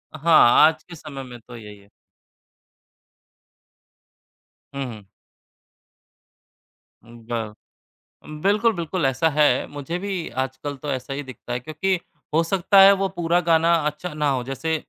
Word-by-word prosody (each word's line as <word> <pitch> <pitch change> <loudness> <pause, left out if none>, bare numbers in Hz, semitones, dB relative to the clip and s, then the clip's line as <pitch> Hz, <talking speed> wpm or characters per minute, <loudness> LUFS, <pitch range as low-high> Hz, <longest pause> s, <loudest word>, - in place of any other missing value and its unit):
हाँ, 155 -5 +5 0.2
आज 155 -1 -3
के 170 - -12
समय 140 -3 -9
में 125 -2 -11
तो 120 +2 -14
यही 105 -3 -11
है। 100 0 -22 2.8
हुँ, 140 - -4
हुँ। 105 -3 -14 2.0
हुँ, 120 0 -15
ब 110 -3 -4 0.7
उम, 155 0 -10
बिल्कुल, 215 +4 +2
बिल्कुल 170 -1 -3
ऐसा 135 +5 +1
है। 145 -4 +2
मुझे 145 +4 -5
भी 195 -4 -4 0.2
आजकल 135 +2 -6
तो 145 - -3
ऐसा 130 +1 -4
ही 145 +1 -5
दिखता 125 -1 -9
है 125 - -2
क्योंकि 170 +7 -2 0.3
हो 165 +2 +3
सकता 195 +3 +2
है, 195 - +9
वो 195 0 0
पूरा 175 0 +1
गाना 165 +1 +4
अच्छा 150 +3 -5
ना 150 -1 0
हो। 125 -2 -1
जैसे 135 +5 -3
150 Hz, 145 wpm, -22 LUFS, 130-170 Hz, 2.8 s, है